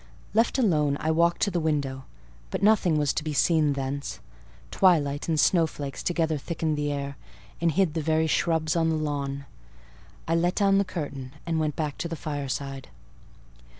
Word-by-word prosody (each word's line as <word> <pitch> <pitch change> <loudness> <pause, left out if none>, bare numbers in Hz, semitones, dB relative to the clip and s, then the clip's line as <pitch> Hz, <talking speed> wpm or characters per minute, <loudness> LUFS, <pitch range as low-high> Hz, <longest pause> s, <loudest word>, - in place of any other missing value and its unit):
Left 230 +4 +2
alone, 150 - +2
I 160 - 0
walked 170 +1 +2
to 200 - +1
the 175 - 0
window; 140 -4 -1 0.4
but - - -3
nothing 200 -6 +4
was 145 -2 +1
to - - -2
be 155 -1 -3
seen 155 -1 +3
thence: 140 +1 -4 0.5
twilight 150 -6 +2
and 160 -2 +1
snowflakes 155 -6 +1
together 160 -3 0
thickened 160 0 -2
the 145 0 -1
air, 140 -1 -4 0.4
and 170 -1 +3
hid 180 -1 +2
the 160 - -1
very 160 +1 +2
shrubs 160 0 +1
on 165 -1 +2
the 160 - +1
lawn. 140 -2 -3 0.8
I 165 - +1
let 175 +2 +1
down 195 -1 +3
the 200 - +1
curtain 140 -7 -6
and 165 -2 0
went 155 -2 -1
back 150 -3 -3
to - - -2
the 165 - -4
fireside. 140 -3 -4
155 Hz, 175 wpm, -26 LUFS, 145-170 Hz, 0.8 s, nothing